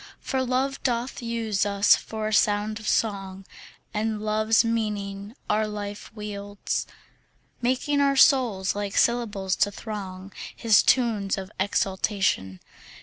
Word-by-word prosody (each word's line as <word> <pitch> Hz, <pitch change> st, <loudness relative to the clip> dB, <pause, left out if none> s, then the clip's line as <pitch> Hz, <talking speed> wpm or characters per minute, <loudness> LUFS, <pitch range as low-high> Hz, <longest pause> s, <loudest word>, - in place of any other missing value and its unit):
For 265 Hz, -2 st, -1 dB
Love 260 Hz, +2 st, -1 dB
doth 245 Hz, 0 st, -2 dB
use 230 Hz, -4 st, -1 dB
us 200 Hz, 0 st, +4 dB
for 220 Hz, -1 st, -5 dB
a -, -, -3 dB
sound 210 Hz, +1 st, +2 dB
of 215 Hz, -, -8 dB
song, 195 Hz, -3 st, -1 dB, 0.5 s
And 215 Hz, 0 st, -1 dB
Love's 215 Hz, +2 st, +2 dB
meaning 210 Hz, -2 st, -3 dB
our 215 Hz, +1 st, +1 dB
life 205 Hz, -1 st, -6 dB
wields, 205 Hz, -1 st, -4 dB, 0.7 s
Making 260 Hz, +4 st, +1 dB
our 275 Hz, -1 st, +3 dB
souls 235 Hz, -10 st, +4 dB
like 205 Hz, -1 st, -4 dB
syllables 210 Hz, -6 st, +1 dB
to 205 Hz, -, +3 dB
throng 195 Hz, -3 st, -7 dB, 0.2 s
His 225 Hz, -3 st, +5 dB
tunes 220 Hz, -7 st, +2 dB
of 190 Hz, +1 st, -6 dB
exultation. 190 Hz, -, 0 dB
210 Hz, 125 wpm, -25 LUFS, 200-230 Hz, 0.7 s, His